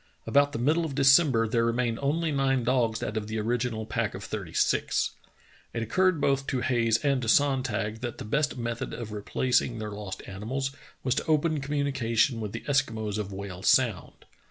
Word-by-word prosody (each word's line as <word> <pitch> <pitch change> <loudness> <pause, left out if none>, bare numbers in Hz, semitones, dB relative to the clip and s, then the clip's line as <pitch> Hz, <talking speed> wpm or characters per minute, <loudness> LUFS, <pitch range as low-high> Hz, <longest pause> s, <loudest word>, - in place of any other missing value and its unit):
About 145 0 +3
the - - -4
middle 150 +8 +2
of 150 -4 -4
December 135 -4 +5
there 115 +1 +1
remained 115 0 0
only 155 +3 0
nine 135 -2 +1
dogs 115 -2 +1
out 110 - -3
of 105 -1 -3
the 110 +1 -3
original 115 0 -1
pack - - -2
of - - -7
thirty - - -5
six. - - +1 0.6
It 115 - -1
occurred 185 +7 +2
both 135 -1 +1
to 130 - -1
Hayes 115 -3 +2
and 140 -2 +2
to 115 - -4
Sonntag 120 -6 +1
that 120 -1 -5
the - - -7
best 145 +5 0
method 120 -1 -4
of 115 -3 -6
replacing 120 +3 0
their 105 -1 -5
lost 100 -2 -7
animals 125 +8 -3 0.3
was 130 - +2
to - - -2
open 155 -1 +2
communication 135 -5 0
with 105 -2 -4
the 110 - -5
Eskimos 110 -7 0
of 100 -1 -4
Whale 95 -2 -7
Sound. 115 -5 +1
120 Hz, 185 wpm, -27 LUFS, 110-140 Hz, 0.6 s, December